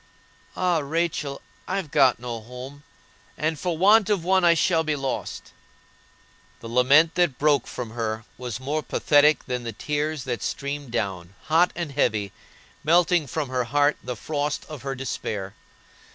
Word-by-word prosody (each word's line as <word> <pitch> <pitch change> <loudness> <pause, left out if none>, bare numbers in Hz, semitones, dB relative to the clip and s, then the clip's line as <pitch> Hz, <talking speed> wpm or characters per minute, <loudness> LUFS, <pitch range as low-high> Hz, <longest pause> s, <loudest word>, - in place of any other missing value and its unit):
ah, 180 -3 +1
Rachel, 150 -1 -2 0.2
I've 185 -5 -3
got 130 -3 +4
no 120 -1 -5
home, 125 +5 -10 0.6
and 155 0 -1
for 175 -1 -2
want 205 +3 +5
of 200 -5 +1
one 190 +1 +3
I 170 -1 +6
shall 165 0 +2
be 155 -1 0
lost!" 135 -2 -4 1.1
The 115 - -9
lament 140 +7 +5
that 175 -7 +1
broke 145 -4 +2
from 120 -3 -6
her 110 -1 -3
was 125 -1 -5
more 145 +4 -2
pathetic 150 0 +3
than 125 -1 -3
the 115 -1 -5
tears 150 +4 -2
that 120 -2 -3
streamed 140 -1 -4
down, 100 -5 -3
hot 165 +3 +3
and 170 -4 -4
heavy, 110 -8 0 0.5
melting 170 0 +3
from 145 +1 -3
her 130 -1 -1
heart 145 +4 +2
the 125 0 -4
frost 145 +4 -3
of 155 -5 -8
her 135 +1 -4
despair. 105 -6 -4
145 Hz, 155 wpm, -24 LUFS, 125-160 Hz, 1.1 s, I